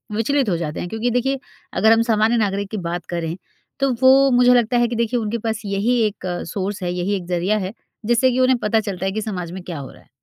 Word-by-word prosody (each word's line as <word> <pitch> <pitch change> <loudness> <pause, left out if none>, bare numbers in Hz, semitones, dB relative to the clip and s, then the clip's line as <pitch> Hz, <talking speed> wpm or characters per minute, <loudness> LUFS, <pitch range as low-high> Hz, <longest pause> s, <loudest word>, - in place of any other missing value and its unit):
विचलित 255 +1 +1
हो 170 - +1
जाते 155 -2 -4
हैं। 175 - -5
क्योंकि 230 +2 -1
देखिए 265 +3 0 0.3
अगर 220 +3 +4
हम 225 - +3
सामान्य 220 +2 +3
नागरिक 200 -2 -1
की 215 - -3
बात 175 0 -4
करें 170 -1 -3 0.4
तो 275 -1 +2
वो 270 +1 +6
मुझे 250 0 +5
लगता 240 +1 +2
है 240 0 +3
कि 235 - -4
देखिए 235 +1 0
उनके 220 +1 -2
पास 220 0 -2
यही 205 +5 +1
एक 200 -2 -8 0.3
सोर्स 195 0 -3
है 175 0 -1
यही 180 +3 -1
एक 180 - -8
ज़रिया 180 +4 0
है 190 +2 -4 0.3
जिससे 240 +2 +3
कि 250 - -1
उन्हें 255 -1 +4
पता 220 +1 +1
चलता 195 -3 -4
है 195 - 0
कि 220 +2 -3
समाज 180 -6 -4
में 185 -1 -7
क्या 170 -5 -6
हो 135 - -8
रहा - - -17
है। - - -27
215 Hz, 250 wpm, -21 LUFS, 185-240 Hz, 0.4 s, वो